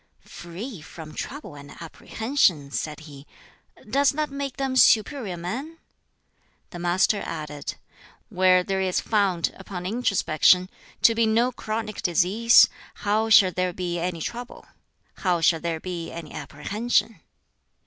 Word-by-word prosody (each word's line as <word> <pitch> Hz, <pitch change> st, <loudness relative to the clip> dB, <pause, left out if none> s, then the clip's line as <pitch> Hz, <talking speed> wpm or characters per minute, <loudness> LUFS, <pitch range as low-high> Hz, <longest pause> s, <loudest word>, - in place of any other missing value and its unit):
"'Free 180 Hz, -, -9 dB
from 155 Hz, 0 st, -11 dB
trouble 285 Hz, -, -7 dB
and 145 Hz, 0 st, -12 dB
apprehension!'" 170 Hz, -, -1 dB
said 150 Hz, +1 st, -4 dB
he. 145 Hz, -2 st, -13 dB, 0.6 s
"Does 275 Hz, +5 st, +3 dB
that 300 Hz, 0 st, -2 dB
make 275 Hz, -1 st, -5 dB
them 270 Hz, -1 st, -2 dB
'superior 225 Hz, -5 st, +3 dB
men'?" 250 Hz, -, -5 dB, 0.9 s
The 175 Hz, -, -8 dB
Master 180 Hz, +4 st, +1 dB
added, 150 Hz, -3 st, -6 dB, 0.5 s
"Where 185 Hz, 0 st, +4 dB
there 190 Hz, 0 st, -1 dB
is 185 Hz, -1 st, 0 dB
found, 195 Hz, -6 st, 0 dB
upon 185 Hz, -2 st, -7 dB
introspection, 185 Hz, -4 st, +2 dB, 0.3 s
to 230 Hz, -, +7 dB
be 225 Hz, 0 st, +2 dB
no 235 Hz, +3 st, +2 dB
chronic 215 Hz, -2 st, -5 dB
disease, 195 Hz, +6 st, +5 dB, 0.4 s
how 215 Hz, +2 st, +1 dB
shall 195 Hz, -4 st, +7 dB
there 185 Hz, 0 st, -1 dB
be 175 Hz, -1 st, -3 dB
any 170 Hz, -1 st, -3 dB
trouble? 240 Hz, +8 st, -7 dB, 0.5 s
how 180 Hz, -3 st, +1 dB
shall 165 Hz, 0 st, +3 dB
there 165 Hz, -1 st, -3 dB
be 175 Hz, -1 st, -6 dB
any 170 Hz, -2 st, -8 dB
apprehension?" 210 Hz, +5 st, -2 dB
185 Hz, 130 wpm, -24 LUFS, 170-230 Hz, 0.9 s, to